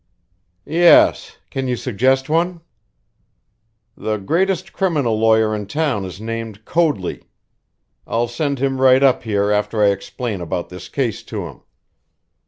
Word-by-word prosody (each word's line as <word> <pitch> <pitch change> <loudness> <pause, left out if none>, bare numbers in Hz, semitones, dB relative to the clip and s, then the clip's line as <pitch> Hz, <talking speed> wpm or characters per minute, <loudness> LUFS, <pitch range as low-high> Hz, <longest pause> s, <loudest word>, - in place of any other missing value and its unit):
"Yes. 170 +1 +4
Can 135 -1 -3
you 125 - 0
suggest 130 +3 +1
one?" 170 +2 0 1.3
"The 110 0 -2
greatest 185 - -1
criminal 150 - 0
lawyer 110 -1 +3
in 105 -2 -5
town 140 -5 -1
is 90 +1 -8
named 115 -1 -6
Coadley. 150 - -1 0.8
I'll 115 +1 0
send 140 +4 -2
him 135 0 -1
right 130 +1 +5
up 130 -2 +4
here 105 -2 0
after 105 +1 0
I 100 - +6
explain 100 +1 -4
about 85 +1 -4
this 90 0 -10
case 125 -6 -2
to - - -5
him. - - -11
120 Hz, 135 wpm, -19 LUFS, 105-145 Hz, 1.3 s, I